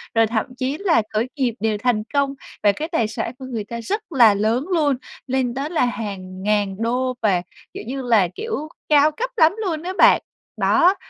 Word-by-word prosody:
rồi 225 0 +4
thậm 220 -1 -1
chí 265 +3 -2
là 350 - +3
khởi 220 +3 +1
nghiệp 260 -5 0
đều 220 -1 0
thành 215 -1 0
công 280 -1 +1 0.3
và 205 - +6
cái 305 +10 -4
tài 235 -10 +1
sản 225 +2 -4
của 260 - -7
người 235 -5 -4
ta 235 +3 -6
rất 415 - -2
là 235 -7 +6
lớn 220 +7 0
luôn, 295 -5 +2 0.3
lên 260 -2 0
tới 275 +4 -3
là 325 -7 +2
hàng 195 -5 -5
ngàn 205 -2 +1
đô 250 +3 0
và, 195 -5 +2 0.3
kiểu - - -7
như 270 +1 -3
là, 225 -7 +3
kiểu, 440 -9 -4 0.2
cao 300 0 +5
cấp - - -3
lắm 325 +2 +5
luôn 320 -3 -2
á 370 +1 -3
bạn. - - +6 0.4
Đó, 365 +3 +4
250 Hz, 205 wpm, -21 LUFS, 215-300 Hz, 0.4 s, và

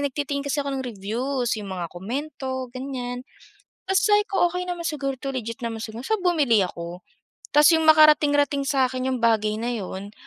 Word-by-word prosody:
nagtitingin 280 +1 -3
kasi 285 0 -1
ako 275 -1 -2
ng - - -5
reviews, 245 +5 -2
'yung 200 - -7
mga 180 -3 -5
komento, 260 - -5
ganiyan. 255 -1 -5 0.6
Tas 385 0 +2
say 420 -3 +4
ko, 390 -4 +2
"Okey 360 +1 -4
naman 350 -2 -3
siguro 275 -3 -3
'to, 270 -1 -4
legit 230 +1 -5
naman 225 -2 -4
siguro," 220 +1 -7
so 440 - 0
bumili 300 - +2
ako. 175 0 -7 0.5
Tas 300 +3 +7
'yung 320 -1 +2
makarating 305 -2 +6
rating 285 -1 +1
sa'kin 260 -1 +1
'yung 260 - 0
bagay 220 -3 +2
na 235 +2 -2
'yun, 200 -2 -6
265 Hz, 180 wpm, -24 LUFS, 230-295 Hz, 0.6 s, Tas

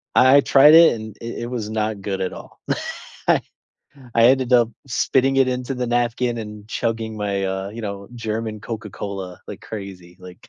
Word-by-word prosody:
I 130 +2 +7
I - - +6
tried 140 +2 +6
it, 165 0 +8
and 110 -1 -9
it 115 0 -5
it - - -4
was 115 -4 -4
not 110 -1 -2
good 95 -1 -3
at 95 - -2
all. - - -12 0.7
I - - +4 0.7
I 115 0 +5
ended 130 0 +3
up 120 -2 +4 0.2
spitting 135 +1 +1
it 135 -1 +5
into 125 +1 -2
the 125 0 -2
napkin 120 0 0
and 105 -1 -8
chugging 110 0 -2
my, 100 -2 -2
uh, 95 0 -3
you 115 +2 -8
know, 100 -1 -6
German 110 -2 -4
Coca-Cola 100 -4 -6
like - - -8
crazy, 95 -4 -9
like 90 -1 -13
110 Hz, 185 wpm, -21 LUFS, 100-125 Hz, 0.7 s, it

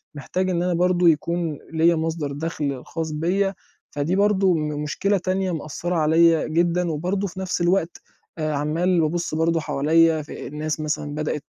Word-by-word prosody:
محتاج 185 +6 -2
إن 175 -1 0
أنا 180 0 0
برضه 175 0 +3
يكون 165 0 -1
ليّا 165 +1 +4
مصدر 160 -2 -2
دَخْل 145 -3 -3
خاص 160 -1 -4
بيّا، 185 +6 0 0.4
فدي 150 +6 -1
برضه 200 -2 +3
م 150 -2 -2
مشكلة 195 +7 0
تانية 185 +1 -1
مأثَّرة 165 +2 -3
عليّا 165 +1 +4
جدًا 170 +2 +1
وبرضه 180 +6 -1
في 185 +1 -9
نَفْس 185 -2 -2
الوقت 175 -1 +1 0.4
آآ 155 -1 -1
عَمّال 165 +5 +1
بابُص 165 +1 -1
برضه 165 +1 +2
حواليّا 160 +2 +2
في 150 - -8
الناس 150 +2 -3
مثلًا 150 -1 -3
بدأت 150 -1 -3
165 Hz, 160 wpm, -23 LUFS, 155-180 Hz, 0.4 s, ليّا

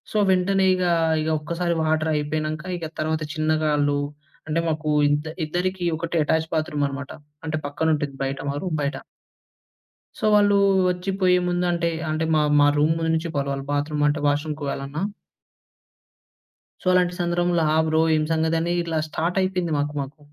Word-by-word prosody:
So, - - -11
వెంటనే 190 +1 +2
ఇగా, 180 -1 +1 0.3
ఇగ 155 - -2
ఒక్కసారి 170 +3 -2
వాటరయిపోయినంక, 155 0 -1 0.2
ఇక 170 - -5
తర్వాత 155 0 -1
చిన్నగా 155 -1 0
ఆళ్ళు 145 0 +1 0.5
అంటే, 160 +1 0
మాకూ 155 -1 -1 0.2
ఇద్ద 145 +1 0 0.2
ఇద్దరికి 180 +3 -2
ఒకటే 170 +1 -2
ఎటాచ్ 160 +1 +1
బాత్రూమనమాట. 145 -3 -2 0.3
అంటే, 155 0 -1
పక్కనుంటుంది 145 -1 -1
బయట, 135 0 -3
మా 140 - -2
రూమ్ 175 -4 -2
బయట. 140 - -1 1.2
సో, - - -11
వాళ్ళూ 205 -1 +5 0.4
ఒచ్చి 180 +2 -3
పోయే 180 -1 +5
ముందంటే 175 -1 0 0.2
అంటే, 155 +1 -1
మా 155 - +4 0.2
మా 145 - +6
రూమ్‌లో 160 +2 +2
నుంచి 165 +1 -1
పోవాలి 140 -1 -1
వాళ్ళు 135 0 -5
బాత్రూమంటే, 150 +1 +1
వాష్‌రూమ్‌కి 150 +1 -1
పోవాలన్నా. 140 +2 -4 1.8
సో, - - -19
అలాంటి 180 -1 +3
సందర్భంలో, 175 -1 +1
ఆ! - - +3
బ్రో 160 0 +2
ఏం 155 - +1
సంగతనీ, 160 +1 +1
ఇట్లా 165 -2 -1
స్టార్టయిపోయింది 180 +1 -1
మాకు, 145 +1 -1
మాకు. 140 +3 -8
160 Hz, 145 wpm, -23 LUFS, 150-175 Hz, 1.8 s, మా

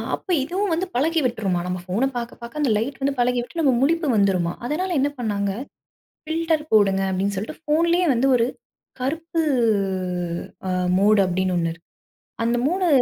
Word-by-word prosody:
அப்ப - - -19 0.2
இதுவும் 370 +5 -1
வந்து 355 +4 0
பழகி 320 +5 +2
விட்ருமா, 200 -7 0
நம்ம 180 0 -2
போன 215 +8 0
பாக்க 235 0 -4
பாக்க 235 +6 -6
அந்த 270 -6 +2
லைட் 270 +6 -3
வந்து 275 +1 +1
பழகிவிட்டு 245 +6 0
நமக்கு 260 -5 +3
முழிப்பு 330 +3 +2
வந்துருமாம். 185 -4 +1
அதனால 345 +9 -1
என்ன 285 +2 +2
பண்ணாங்க, 200 -3 -1 0.7
ஃபில்டர் 320 -1 0
போடுங்க 195 -3 +4
அப்டின்னு 195 +2 -1
சொல்லிட்டு 210 +10 -5
போன்லே 340 +3 +3
வந்து 250 +3 +2
ஒரு 230 -1 +3 0.5
கருப்பு 325 +5 -2 1.3
அ, - - -1 0.3
மோடு 205 +2 +4
அப்டின்னு 185 0 0
ஒண்ணு 165 -1 0
இருக்கு. 165 - -21 0.6
அந்த 235 +1 +1
மோடு 365 +2 +1
245 Hz, 155 wpm, -23 LUFS, 200-320 Hz, 1.3 s, போடுங்க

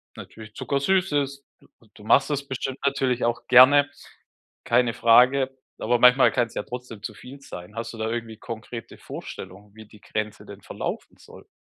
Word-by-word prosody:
natürlich 110 -1 -12
zuckersüß 180 +6 0
ist, 140 -1 -2
du - - -23 0.3
du 105 - -16
machst 135 +6 +4
das 140 -1 -1
bestimmt 130 0 -4
natürlich 130 -3 0
auch 120 0 -1
gerne, 140 +3 +7 0.8
keine 120 -1 +2
Frage, 130 +3 +4 0.2
aber 120 +2 +1
manchmal 125 +2 +6
kann 120 -2 +1
es - - -17
ja - - -2
trotzdem 120 -3 -9
zu 110 - -5
viel 135 +5 -12
sein. 90 -5 -10
Hast 115 +1 -5
du 115 - -11
da 110 0 -2
irgendwie 115 -1 -5
konkrete 115 0 -8
Vorstellungen, 100 +2 -10
wie 110 -1 -13
die 105 -1 -18
Grenze 105 0 -5
denn - - -12
verlaufen - - -6
soll? - - -16
120 Hz, 175 wpm, -24 LUFS, 110-135 Hz, 0.8 s, gerne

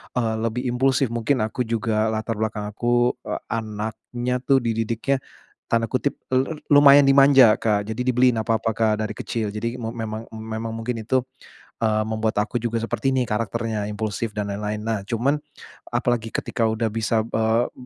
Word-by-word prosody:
eee, 115 -3 0
lebih 115 +3 -1
impulsif 130 +2 +2
mungkin 120 +3 0
aku 110 +3 -2
juga 110 -1 0
latar 110 +1 -2
belakang 105 -1 -2
aku, 120 +2 +1
eee, - - -4
anaknya 110 +3 -3
tuh 135 -1 +4
dididiknya 115 +4 0 0.5
tanda 115 -1 +2
kutip 140 +2 -1 0.2
lu 135 +4 +1 0.2
lumayan 145 -1 +7
"dimanja" 135 -4 +7
Kak, 105 -2 0
jadi 110 +3 -3
dibeliin 125 -1 +3
apa-apa 115 0 0
Kak 110 -1 +1
dari 105 - -7
kecil. 110 -3 -3
Jadi 115 +3 -3
me 115 - -4
memang 110 0 -5
memang 110 +1 -5
mungkin 115 +1 -3
itu, 125 +3 0 0.5
eee, 110 -1 +1
membuat 110 -1 0
aku 120 +3 -2
juga 115 -1 -2
seperti 135 +3 -1
ini 130 - +2
karakternya 110 0 -2
impulsif 105 +1 -3
dan 105 -1 -3
lain-lain. 105 +1 -3
Nah 110 -3 -2
cuman 125 +7 +1 0.6
apalagi 120 -2 0
ketika 115 - -1
udah 110 0 0
bisa, 110 +1 0
eee, 110 +2 +2
m 125 - -14
115 Hz, 165 wpm, -23 LUFS, 110-125 Hz, 0.6 s, lumayan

